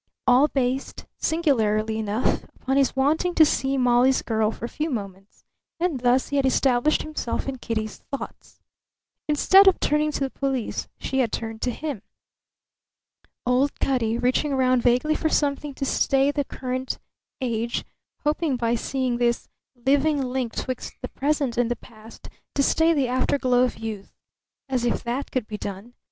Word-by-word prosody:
All 255 +4 +5
based, 265 -1 -2
singularly 220 -9 +1
enough, 215 +2 0 0.2
upon 265 +1 -1
his 275 -1 +2
wanting 310 +6 +1
to 315 - +7
see 275 -2 0
Molly's 250 +1 +3
girl 220 -2 +1
for 225 - -6
a - - -3
few 305 +5 -3
moments; 200 -5 -7 0.3
and 340 -6 0
thus 245 +1 +2
he 285 - 0
had 275 - +2
established 260 +2 +2
himself 305 -6 -3
in 265 -2 -4
Kitty's 220 -2 -3
thoughts. 275 - -8 0.7
Instead 380 +6 +6
of 380 - +5
turning 300 +1 +1
to - - -3
the 270 -1 -1
police 270 -4 -2
she 265 - -2
had 235 -4 +1
turned 225 -1 -5
to 255 - 0
him. 280 -3 -4 1.4
Old 255 +3 +1
Cutty, 235 -4 +1
reaching 260 +4 +1
round 255 -1 +3
vaguely 250 +6 +3
for 315 - 0
something 285 -1 0
to 275 - -3
stay 275 +1 +2
the 285 -1 -1
current 255 0 -4 0.4
age; 235 -2 -2 0.4
hoping 300 -1 +1
by 235 -1 0
seeing 250 +1 -1
this 240 -1 0 0.3
living 280 +4 +2
link 255 -3 -2
'twixt 255 -1 -4
the 255 - -3
present 280 -4 -1
and 240 -1 +2
the 240 - 0
past 225 -1 -14 0.3
to 280 - +3
stay 320 +4 +3
the 280 -5 +2
afterglow 255 0 +2
of 250 - -4
youth. 220 -3 -7 0.5
As 255 -3 -1
if 240 - 0
that 245 +4 -3
could 255 -4 -1
be 210 -1 -6
done! 200 +4 -7
255 Hz, 165 wpm, -24 LUFS, 235-280 Hz, 1.4 s, to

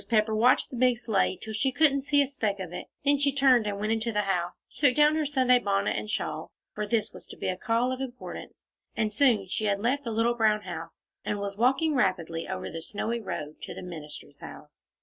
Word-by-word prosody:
Pepper 220 -1 +2
watched 235 +4 +3
the - - -6
big 250 0 +3
sleigh 215 -5 +1
till 220 - -8
she 265 +5 +1
couldn't 280 0 +3
see 285 +1 +3
a - - -1
speck 220 -7 -2
of 180 -2 -6
it; - - -6 0.2
then 285 0 +4
she 285 0 +2
turned 260 -5 +4
and 200 -1 -3
went 215 +1 -1
into 225 +1 0
the 210 -1 +1
house, 180 -3 -2
took 280 -4 +3
down 300 +1 +5
her 310 -2 0
Sunday 255 -3 +4
bonnet 200 -3 0
and 215 - -4
shawl, - - -3 0.2
for 210 0 -3
this 225 -1 0
was - - -11
to - - -11
be - - -4
a 185 - 0
call 230 +6 0
of 260 0 -4
importance, 250 -2 -8 0.3
and 215 -2 0
soon 230 -5 +3
she 215 +4 -2
had 200 -1 +1
left 260 +6 0
the 235 - -4
little 230 +2 +2
brown 215 -2 +2
house, - - -8 0.2
and 210 - -2
was 200 0 -4
walking 270 +8 +2
rapidly 175 - 0
over 190 - -4
the 165 0 -6
snowy 225 +6 -2
road 155 -7 -6
to - - -7
the - - -7
minister's 150 -4 -9
house. 150 -1 -12
225 Hz, 230 wpm, -28 LUFS, 200-255 Hz, 0.3 s, down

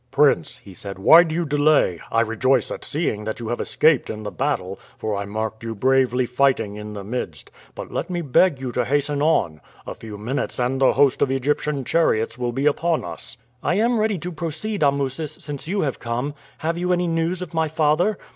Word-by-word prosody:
"Prince," - - +2
he 95 - -14
said, 100 +1 -7
"why 160 - +8
do 160 -2 -1
you 170 0 0
delay? 145 - +3
I 115 - +3
rejoice 115 +2 +1
at - - -6
seeing 140 -9 -2
that 110 +2 -4
you 115 -2 -5
have 120 - -2
escaped 155 -3 +2
in 110 0 -5
the 105 - -5
battle, 95 -10 -2 0.2
for 110 -1 -2
I 100 0 -3
marked 110 +2 -4
you 115 -1 -4
bravely 130 +2 +2
fighting 125 -4 +1
in 105 0 -7
the 100 -1 -6
midst; 120 +5 -5 0.2
but - - -7
let - - -3
me 175 -1 -2
beg 145 +2 +3
you 130 -2 -4
to 125 - 0
hasten 145 +3 0
on. 85 - +1 0.2
A - - -5
few 110 -2 -9
minutes 120 +6 -3
and 130 +2 0
the 135 - +5
host 140 -1 +3
of 140 - +3
Egyptian 140 +1 -1
chariots 115 -9 +1
will 125 -1 -2
be 135 +4 -2
upon 160 - +1
us." 85 +7 -7 0.2
"I - - +1
am 230 +3 +2
ready 215 -2 +1
to 180 +2 -5
proceed, 170 +6 -4
Amusis, 140 +1 0
since 145 0 -6
you 195 +3 0
have 135 -4 -2
come. 120 +5 -3 0.2
Have 165 +2 -2
you 180 +1 0
any 180 0 +1
news 165 +2 -1
of 175 - -10
my 160 -1 +1
father?" 160 +6 +2
135 Hz, 210 wpm, -22 LUFS, 115-160 Hz, 0.2 s, why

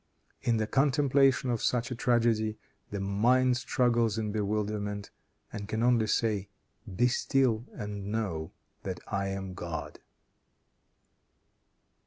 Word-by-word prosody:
In 115 -2 +1
the 110 - +1
contemplation 135 0 +3
of 115 - -1
such 125 0 0
a - - -2
tragedy, 115 -3 +2 0.3
the 100 - -4
mind 120 +6 +3
struggles 120 -3 +1
in 110 -2 -1
bewilderment, 105 -1 -2 0.4
and 100 0 -5
can 110 +2 -1
only 120 -3 +3
say, 105 -3 0 0.5
"Be 120 +6 +4
still 125 -2 +1
and 100 -1 -6
know 95 -8 -2 0.3
that 95 -2 -4
I 100 -1 -1
am 95 -1 -4
God." 80 -5 -6
110 Hz, 120 wpm, -30 LUFS, 100-125 Hz, 0.5 s, Be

